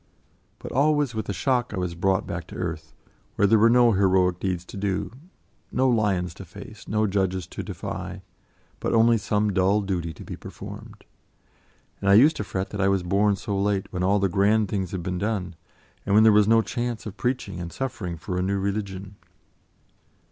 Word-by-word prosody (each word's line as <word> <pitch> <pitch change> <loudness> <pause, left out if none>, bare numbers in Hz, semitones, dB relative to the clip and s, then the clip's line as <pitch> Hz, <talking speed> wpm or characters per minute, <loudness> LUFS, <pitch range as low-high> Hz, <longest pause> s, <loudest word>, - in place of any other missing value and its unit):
But - - -8
always, 145 -1 +2
with 110 -1 -4
a - - +1
shock, 120 - 0
I - - -5
was 90 -2 -2
brought 95 +2 +1
back 85 0 -5
to - - -11
earth, 80 -3 -5 0.4
where 100 - +3
there 110 +2 +5
were 115 +2 +6
no 120 0 +5
heroic 95 -3 +2
deeds 90 -2 -2
to - - -11
do, 95 0 -2 0.6
no 130 +1 +2
lions 100 -8 +1
to 95 - -10
face, 100 +4 -12
no 110 0 +1
judges 95 -3 0
to - - -7
defy, - - -6 0.6
but - - -1
only 115 0 +5
some 105 0 0
dull 95 +3 +3
duty 90 -4 -2
to 80 - -11
be - - -7
performed. - - -10 0.9
And 100 - 0
I 100 - +7
used 145 +9 +6
to - - -2
fret 95 0 -4
that 105 - -3
I 95 - +3
was 100 -2 +1
born 100 +3 +2
so 100 +1 -4
late, 100 0 -1
when 90 - -2
all 95 +3 +3
the 100 -1 +2
grand 100 +3 +2
things 95 -3 -2
had 90 -1 -5
been 90 0 -3
done, 95 -4 -2 0.5
and 100 - +1
when 110 - +7
there 110 - +7
was 105 -1 +5
no 115 0 +5
chance 120 -1 -3
of 105 -3 -7
preaching 115 -4 -2
and 85 -1 -6
suffering 95 -10 -4
for 90 +3 -4
a - - +1
new 100 +2 0
religion. 100 0 -4
100 Hz, 200 wpm, -25 LUFS, 95-110 Hz, 0.9 s, I